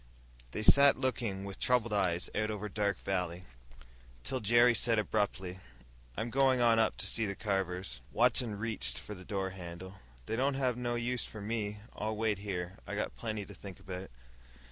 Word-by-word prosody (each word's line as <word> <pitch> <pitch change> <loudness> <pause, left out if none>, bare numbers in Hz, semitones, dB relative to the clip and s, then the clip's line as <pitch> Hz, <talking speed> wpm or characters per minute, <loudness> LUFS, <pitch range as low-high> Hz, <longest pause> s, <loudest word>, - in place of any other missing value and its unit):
They 105 - -4
sat 140 +4 +7
looking 115 -7 -1
with 100 -1 -7
troubled 120 -3 +2
eyes 90 -3 +2
out 110 0 0
over 105 -1 -3
Dark 100 -1 0
Valley, 90 -2 -2 0.8
till 130 - -1
Jerry 120 +3 +5
said 115 0 +3
abruptly, 100 -4 -1 0.6
"I'm 115 +1 -2
going 130 0 +4
on 115 -2 +5
up 110 - +2
to - - -1
see 115 -2 +2
the 100 - -3
Carvers." 95 - -1
Watson 120 -2 +3
reached 105 - -1
for 70 +9 -6
the 95 -2 -10
door 95 0 -2
handle. 95 +1 -9 0.3
"They - - -2
don't 135 +3 +1
have 130 -3 +1
no 120 0 -2
use 120 +1 -1
for 110 - -9
me. 105 -1 -3
I'll 110 +1 -2
wait 105 -2 0
here. 95 -2 -4
I - - -4
got - - -2
plenty 105 - -4
to - - -11
think 95 -3 -10
about." 95 0 -7
105 Hz, 180 wpm, -32 LUFS, 95-115 Hz, 0.8 s, sat